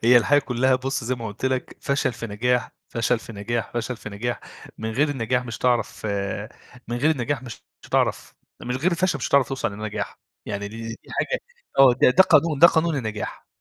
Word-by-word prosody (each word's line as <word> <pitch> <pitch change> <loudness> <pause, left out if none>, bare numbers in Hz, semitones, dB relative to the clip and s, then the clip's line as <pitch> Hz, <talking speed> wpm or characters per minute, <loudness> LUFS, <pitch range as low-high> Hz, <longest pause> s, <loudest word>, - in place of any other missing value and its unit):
هي 120 +1 +7
الحياة 145 +5 +5
كلّها 130 -1 +2
بُص 135 -1 -2
زي 130 +2 0
ما 115 -2 -6
قُلت 105 +4 -7
لَك، 130 -1 -2
فشل 140 -2 0
في 115 - -6
نجاح، 120 +4 0 0.2
فشل 115 +1 +1
في 115 - -10
نجاح، 110 +2 -3
فشل 120 +1 -2
في - - -8
نجاح، 120 +4 -3 0.4
من 110 0 -3
غير 145 +7 +2
النجاح 125 -2 0
مش 120 -3 -5
هتعرف 120 -3 0 0.8
من 120 - -2
غير 150 +6 +3
النجاح 135 -2 -1
مش 120 -3 -9 0.2
هتعرف - - 0 0.3
من 125 +1 -2
غير 170 +7 +1
الفشل 170 -3 +1
مش - - -2
هتعرف 140 -2 +4
توصل 135 -6 -2
لنجاح، 105 +1 -5 0.3
يعني 100 0 -3
دي 110 - -10
دي 115 - -5
دي 115 - -9
حاجة - - -1 0.4
آه، 135 -2 +8
ده - - +8
ده 185 - +7
قانون 155 -4 +3
ده 170 - +10
قانون 165 -2 +2
النجاح، 110 -4 -4
125 Hz, 205 wpm, -24 LUFS, 115-140 Hz, 0.8 s, ده